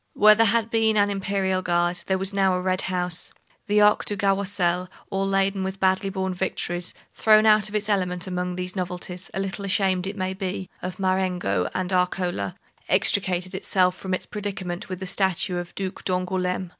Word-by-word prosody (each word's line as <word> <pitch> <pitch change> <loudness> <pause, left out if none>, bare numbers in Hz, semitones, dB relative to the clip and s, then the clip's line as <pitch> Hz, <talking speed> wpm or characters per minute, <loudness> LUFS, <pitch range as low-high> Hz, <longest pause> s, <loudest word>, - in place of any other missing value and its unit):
Where 215 +1 +7
there 225 +1 +4
had 230 +1 +1
been 220 -1 +3
an 205 0 +3
Imperial 195 -1 -1
Guard, 175 0 +1
there 190 - +1
was 195 +1 -2
now 195 -2 +3
a - - -1
red 185 0 0
house. 180 -2 -1 0.4
The 210 0 +3
Arc 210 0 +5
du 205 - -2
Carrousel, 190 -3 0 0.2
all 195 0 0
laden 195 0 +1
with 190 +1 -4
badly 190 +1 +2
borne 190 -1 -2
victories, 175 0 -2 0.2
thrown 215 0 +5
out 215 -1 +5
of 210 - -7
its 210 0 0
element 180 -4 0
among 180 -1 -3
these 180 +1 -3
novelties, 180 0 -5
a - - -4
little 195 +1 -3
ashamed, 190 -1 +1
it 200 +1 -5
may 185 0 -2
be, 190 -1 -4
of 185 - -5
Marengo 185 - 0
and 185 0 -2
Arcola, 180 - 0 0.3
extricated 185 -2 +2
itself 185 -1 +1
from 185 0 -2
its - - -5
predicament 195 -2 -5
with 185 -1 -5
the - - -3
statue 185 -1 +1
of 175 0 -4
the 195 - -3
Duc - - -15
d'Angoulême. 180 0 -1
190 Hz, 190 wpm, -24 LUFS, 180-200 Hz, 0.4 s, Where